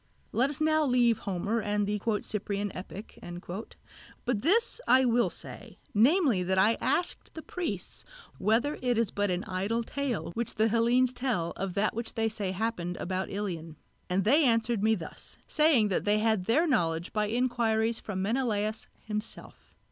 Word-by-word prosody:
Let 255 Hz, +4 st, +2 dB
us 285 Hz, -, -2 dB
now 310 Hz, 0 st, +3 dB
leave 245 Hz, -4 st, +3 dB
Homer 200 Hz, +5 st, -1 dB
and 205 Hz, 0 st, 0 dB
the 205 Hz, 0 st, -2 dB, 0.2 s
"Cyprian 205 Hz, -1 st, -3 dB
Epic"; 195 Hz, +3 st, -9 dB, 1.1 s
but 240 Hz, -5 st, 0 dB
this 455 Hz, -, +2 dB
I 260 Hz, 0 st, +6 dB
will 240 Hz, 0 st, +3 dB
say, -, -, -7 dB, 0.2 s
namely 255 Hz, -, +4 dB
that 190 Hz, +1 st, 0 dB
I 205 Hz, +4 st, +5 dB
asked 350 Hz, -, -1 dB
the 320 Hz, -, -7 dB
priests 360 Hz, -2 st, -5 dB, 0.4 s
whether 230 Hz, +9 st, +1 dB
it 245 Hz, -2 st, +1 dB
is 230 Hz, -3 st, +1 dB
but 205 Hz, 0 st, 0 dB
an 180 Hz, 0 st, -1 dB
idle 200 Hz, +6 st, -1 dB
tale 270 Hz, -6 st, -3 dB
which 235 Hz, +2 st, -2 dB
the 220 Hz, +1 st, +3 dB
Hellenes 240 Hz, +3 st, +3 dB
tell 225 Hz, -11 st, -1 dB
of 190 Hz, -2 st, -4 dB
that 210 Hz, +2 st, +1 dB
which 230 Hz, +1 st, -4 dB
they 225 Hz, -1 st, +1 dB
say 210 Hz, -3 st, -3 dB
happened 185 Hz, -3 st, -2 dB
about 185 Hz, +1 st, -3 dB
Ilion; 170 Hz, -6 st, -4 dB, 0.3 s
and 185 Hz, +2 st, +1 dB
they 285 Hz, -, +4 dB
answered 230 Hz, -3 st, +2 dB
me 220 Hz, +1 st, +3 dB
thus, 170 Hz, -6 st, -9 dB
saying 300 Hz, -9 st, +4 dB
that 190 Hz, -, 0 dB
they 205 Hz, +1 st, +2 dB
had 215 Hz, -3 st, +1 dB
their 275 Hz, -, +3 dB
knowledge 170 Hz, -, 0 dB
by 210 Hz, -1 st, +1 dB
inquiries 230 Hz, -1 st, +1 dB
from 190 Hz, -3 st, -4 dB
Menelaos 215 Hz, -1 st, -1 dB, 0.2 s
himself. 210 Hz, 0 st, -6 dB
220 Hz, 165 wpm, -29 LUFS, 200-245 Hz, 1.1 s, I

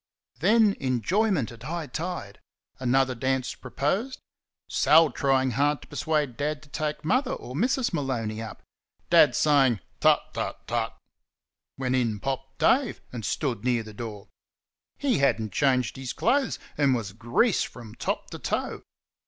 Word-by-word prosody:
Then 210 Hz, +3 st, +4 dB
enjoyment 135 Hz, -, +1 dB
at 115 Hz, -1 st, -13 dB
high 160 Hz, +5 st, -4 dB
tide; 150 Hz, -, -5 dB, 0.4 s
another 130 Hz, +1 st, +2 dB
dance 130 Hz, +1 st, -1 dB
proposed; 210 Hz, -, -2 dB, 0.5 s
Sal 160 Hz, 0 st, +5 dB
trying 135 Hz, -2 st, +2 dB
hard 145 Hz, +4 st, +1 dB
to -, -, -15 dB
persuade 150 Hz, -6 st, -1 dB
Dad 150 Hz, +1 st, -2 dB
to 155 Hz, -, -17 dB
take 150 Hz, 0 st, -3 dB
Mother 255 Hz, -, +2 dB
or 125 Hz, -, -7 dB
Mrs. 245 Hz, -, +1 dB
Maloney 115 Hz, -7 st, -2 dB
up; 110 Hz, -, -8 dB, 0.5 s
Dad 150 Hz, -7 st, +6 dB
saying 135 Hz, -7 st, +4 dB, 0.2 s
"Tut, -, -, +4 dB
tut, -, -, -4 dB
tut!" -, -, -2 dB, 0.8 s
when 130 Hz, -1 st, -1 dB
in 115 Hz, -5 st, +1 dB
popped 135 Hz, +2 st, -4 dB
Dave, 260 Hz, -3 st, +2 dB
and 120 Hz, -3 st, -5 dB
stood 120 Hz, -3 st, -2 dB
near 120 Hz, -2 st, +1 dB
the 110 Hz, 0 st, -10 dB
door. 105 Hz, -2 st, -7 dB, 0.7 s
He 270 Hz, -, +1 dB
had 140 Hz, -4 st, +3 dB
n't 110 Hz, -2 st, -4 dB
changed 130 Hz, 0 st, +1 dB
his 130 Hz, -2 st, -4 dB
clothes, 280 Hz, 0 st, +1 dB, 0.2 s
and 140 Hz, -3 st, +4 dB
was 105 Hz, -5 st, -4 dB
grease 120 Hz, -, +2 dB
from 115 Hz, -3 st, -6 dB
top -, -, -3 dB
to -, -, -7 dB
toe. -, -, -2 dB
135 Hz, 150 wpm, -26 LUFS, 120-160 Hz, 0.8 s, Dad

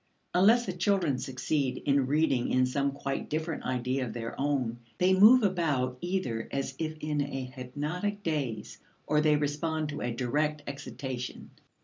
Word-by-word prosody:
Unless 225 Hz, +7 st, +5 dB
the 185 Hz, -, -3 dB
children 175 Hz, -7 st, +1 dB
succeed 130 Hz, +1 st, -1 dB
in 140 Hz, -2 st, +3 dB
reading 140 Hz, -4 st, +2 dB
in 130 Hz, 0 st, +3 dB
some 140 Hz, +2 st, 0 dB
quite 135 Hz, 0 st, -4 dB
different 160 Hz, +1 st, -3 dB
idea 130 Hz, +1 st, -1 dB
of 115 Hz, -3 st, -4 dB
their 115 Hz, -1 st, -5 dB
own, 130 Hz, -5 st, 0 dB, 0.2 s
they 185 Hz, +1 st, +4 dB
move 220 Hz, +6 st, +8 dB
about 145 Hz, -10 st, 0 dB
either 175 Hz, -12 st, -2 dB
as 135 Hz, -1 st, -2 dB
if 155 Hz, -1 st, -3 dB
in 150 Hz, -1 st, 0 dB
a 135 Hz, -2 st, -3 dB
hypnotic 150 Hz, +11 st, -4 dB
daze, 135 Hz, -, -3 dB, 0.3 s
or 150 Hz, 0 st, +2 dB
they 150 Hz, -1 st, +4 dB
respond 150 Hz, +1 st, -1 dB
to 145 Hz, 0 st, -5 dB
a 120 Hz, -, -1 dB
direct 145 Hz, +5 st, -1 dB
excitation. 130 Hz, -2 st, -6 dB
145 Hz, 155 wpm, -29 LUFS, 130-160 Hz, 0.3 s, move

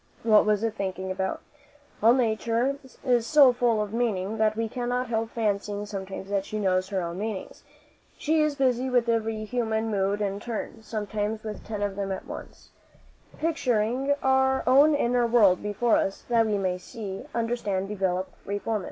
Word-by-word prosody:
What 215 Hz, -2 st, +5 dB
was 210 Hz, 0 st, +2 dB
it 225 Hz, -1 st, 0 dB
thinking 190 Hz, -2 st, -4 dB
about? 190 Hz, 0 st, -2 dB, 0.6 s
All 225 Hz, +3 st, +6 dB
Nature 235 Hz, +3 st, 0 dB, 0.3 s
is 240 Hz, -3 st, +2 dB
so 285 Hz, -5 st, +7 dB
full 235 Hz, -3 st, +2 dB
of 210 Hz, 0 st, -7 dB
meaning, 220 Hz, -3 st, -1 dB
that 215 Hz, 0 st, +2 dB
we 225 Hz, 0 st, 0 dB
cannot 245 Hz, +1 st, -2 dB
help 225 Hz, -1 st, -1 dB
fancying 205 Hz, -2 st, -2 dB
sometimes 195 Hz, -1 st, -6 dB
that 200 Hz, -1 st, +1 dB
she 215 Hz, -, -5 dB
knows 185 Hz, -2 st, +1 dB
her 190 Hz, -3 st, -1 dB
own 170 Hz, +2 st, -5 dB
meanings. 215 Hz, -2 st, -5 dB, 0.6 s
She 315 Hz, +1 st, +1 dB
is 305 Hz, -1 st, +1 dB
busy 260 Hz, -2 st, +1 dB
with 245 Hz, -2 st, +2 dB
every 225 Hz, -1 st, 0 dB
human 225 Hz, -1 st, -1 dB
mood 200 Hz, 0 st, 0 dB
in 200 Hz, -1 st, -2 dB
turn 225 Hz, 0 st, -5 dB
sometimes 215 Hz, 0 st, -3 dB
with 215 Hz, -1 st, -6 dB
ten 210 Hz, -2 st, -4 dB
of 200 Hz, -1 st, -2 dB
them 195 Hz, -1 st, -3 dB
at 190 Hz, -, -4 dB
once -, -, -10 dB, 0.7 s
picturing 265 Hz, -3 st, +1 dB
our 265 Hz, 0 st, +3 dB
own 285 Hz, +4 st, +6 dB
inner 245 Hz, -3 st, +2 dB
world 210 Hz, -6 st, +4 dB
before 210 Hz, +3 st, +1 dB
us, 195 Hz, -, -2 dB
that 230 Hz, -2 st, +3 dB
we 210 Hz, -1 st, +1 dB
may 185 Hz, -2 st, -1 dB
see, 195 Hz, +3 st, -7 dB
understand, 225 Hz, -5 st, -1 dB
develop, 190 Hz, -2 st, -1 dB, 0.2 s
reform 205 Hz, +2 st, -1 dB
it. -, -, -4 dB
220 Hz, 175 wpm, -26 LUFS, 200-240 Hz, 0.7 s, so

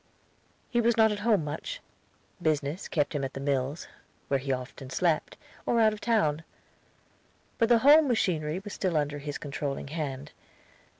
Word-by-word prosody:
He 240 Hz, -, +2 dB
was 235 Hz, 0 st, +2 dB
not 220 Hz, -1 st, +5 dB
at 205 Hz, -, -3 dB
home 210 Hz, -5 st, +2 dB
much. 155 Hz, -, -5 dB, 0.6 s
Business, 155 Hz, +1 st, -1 dB
kept 145 Hz, -3 st, 0 dB
him 145 Hz, -2 st, -2 dB
at 135 Hz, -, -3 dB
the -, -, -6 dB
mills, 140 Hz, +2 st, -1 dB, 0.4 s
where 140 Hz, -, +2 dB
he 135 Hz, +1 st, -3 dB
often 130 Hz, +1 st, -5 dB
slept, 165 Hz, +2 st, 0 dB, 0.3 s
or 235 Hz, -, +1 dB
out 220 Hz, -1 st, +5 dB
of 215 Hz, -, -9 dB
town. 165 Hz, -10 st, +1 dB, 1.2 s
But 230 Hz, -1 st, +3 dB
the 240 Hz, -, +7 dB
home 300 Hz, +1 st, +8 dB
machinery 170 Hz, -, 0 dB
was 205 Hz, -, -7 dB
still 180 Hz, -4 st, 0 dB
under 145 Hz, -1 st, -1 dB
his 145 Hz, 0 st, -5 dB
controlling 140 Hz, -1 st, -4 dB
hand. 145 Hz, -2 st, -4 dB
155 Hz, 165 wpm, -28 LUFS, 140-215 Hz, 1.2 s, home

